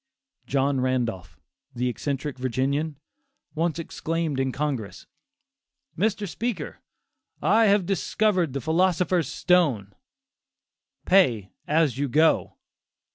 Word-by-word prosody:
John 135 Hz, -1 st, +1 dB
Randolph, 120 Hz, -7 st, -2 dB, 0.4 s
the 125 Hz, +1 st, -1 dB
eccentric 135 Hz, +2 st, -3 dB
Virginian, 135 Hz, +4 st, -1 dB, 0.6 s
once 165 Hz, +1 st, -1 dB
exclaimed 165 Hz, -3 st, -3 dB
in 130 Hz, 0 st, 0 dB
Congress, 125 Hz, -9 st, -4 dB, 0.9 s
"Mr. 210 Hz, -1 st, 0 dB
Speaker, 195 Hz, -4 st, -4 dB, 0.6 s
I 215 Hz, +7 st, +4 dB
have 200 Hz, -2 st, +3 dB
discovered 195 Hz, -4 st, 0 dB
the 140 Hz, -, -3 dB
philosopher's 175 Hz, +1 st, +1 dB
stone: 140 Hz, -, +2 dB, 1.1 s
pay 120 Hz, -, +3 dB, 0.2 s
as 150 Hz, -5 st, +2 dB
you 145 Hz, -1 st, 0 dB
go." 155 Hz, +5 st, +2 dB
150 Hz, 95 wpm, -25 LUFS, 130-180 Hz, 1.1 s, I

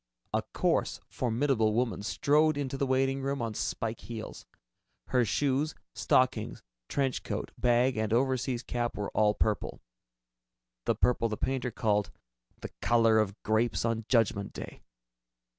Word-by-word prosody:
A -, -, +2 dB
coarse, -, -, 0 dB
formidable 120 Hz, -2 st, +1 dB
woman 120 Hz, -3 st, 0 dB
strode 150 Hz, +7 st, +2 dB
into 135 Hz, -2 st, -2 dB
the 135 Hz, 0 st, -1 dB
waiting 135 Hz, +1 st, +1 dB
room 140 Hz, +1 st, -2 dB
on 115 Hz, -2 st, -2 dB
spike 115 Hz, +1 st, -3 dB
heels. 110 Hz, +2 st, -8 dB, 0.6 s
Her 125 Hz, -1 st, +3 dB
shoes, 145 Hz, +5 st, 0 dB, 0.2 s
stockings, 125 Hz, -4 st, +1 dB, 0.3 s
trench 135 Hz, -2 st, 0 dB
coat, -, -, -4 dB
bag 125 Hz, +1 st, +2 dB
and 110 Hz, 0 st, -1 dB
overseas 130 Hz, 0 st, +1 dB
cap 120 Hz, -1 st, -2 dB
were 105 Hz, -1 st, -3 dB
all 105 Hz, -1 st, +3 dB
purple, 110 Hz, -2 st, -1 dB, 1.1 s
the -, -, +2 dB
purple 120 Hz, -2 st, +2 dB
the 110 Hz, -, -3 dB
painter 130 Hz, -1 st, -1 dB
called 105 Hz, -3 st, 0 dB, 0.5 s
"the -, -, -6 dB
color 115 Hz, -2 st, +4 dB
of 100 Hz, -2 st, 0 dB
grapes 110 Hz, -1 st, +1 dB
on 115 Hz, -1 st, -1 dB
Judgment 115 Hz, -5 st, +2 dB
Day." -, -, -8 dB
120 Hz, 140 wpm, -30 LUFS, 110-130 Hz, 1.1 s, color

